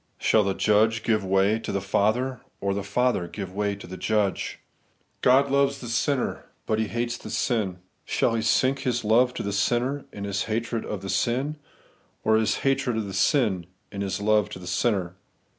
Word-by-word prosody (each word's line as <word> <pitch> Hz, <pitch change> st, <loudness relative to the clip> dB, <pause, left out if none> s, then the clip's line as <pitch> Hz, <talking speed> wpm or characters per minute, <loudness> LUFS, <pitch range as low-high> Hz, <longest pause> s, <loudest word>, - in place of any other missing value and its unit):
Shall 110 Hz, -, +3 dB
the 100 Hz, -1 st, -1 dB
Judge 110 Hz, +2 st, +3 dB
give 110 Hz, -3 st, +1 dB
way 95 Hz, +3 st, +2 dB
to -, -, -5 dB
the 100 Hz, -, 0 dB
Father, 120 Hz, +7 st, 0 dB, 0.2 s
or 100 Hz, 0 st, 0 dB
the 100 Hz, -, -2 dB
Father 100 Hz, -2 st, 0 dB
give 95 Hz, 0 st, -7 dB
way 100 Hz, 0 st, -1 dB
to 100 Hz, -, -11 dB
the 95 Hz, -, -8 dB
Judge? 105 Hz, -2 st, 0 dB, 0.6 s
God 135 Hz, +2 st, +4 dB
loves 140 Hz, 0 st, +2 dB
the 125 Hz, -, -8 dB
sinner; 130 Hz, +3 st, 0 dB, 0.2 s
but 110 Hz, -, 0 dB
He 110 Hz, -, 0 dB
hateathesiii. 120 Hz, -4 st, -2 dB, 0.3 s
Shall -, -, +1 dB
He 115 Hz, -, 0 dB
sink 130 Hz, +4 st, +2 dB
His 125 Hz, -3 st, -1 dB
love 120 Hz, +4 st, +4 dB
to -, -, -3 dB
the 100 Hz, -, -2 dB
sinner 120 Hz, +7 st, 0 dB
in 100 Hz, -, -7 dB
His 100 Hz, 0 st, -2 dB
hatred 115 Hz, +1 st, -2 dB
of 100 Hz, -3 st, -5 dB
the 95 Hz, -, -5 dB
sin, 130 Hz, +9 st, 0 dB, 0.7 s
or 110 Hz, 0 st, +4 dB
His 110 Hz, -1 st, +2 dB
hatred 135 Hz, -3 st, +1 dB
of 110 Hz, -, -1 dB
the 100 Hz, -, -6 dB
sin 95 Hz, -, +2 dB, 0.2 s
in 100 Hz, -, -5 dB
His 100 Hz, -1 st, -2 dB
love 105 Hz, -1 st, +2 dB
to -, -, -7 dB
the 90 Hz, -, -10 dB
sinner 95 Hz, -2 st, 0 dB
110 Hz, 190 wpm, -25 LUFS, 100-120 Hz, 0.7 s, God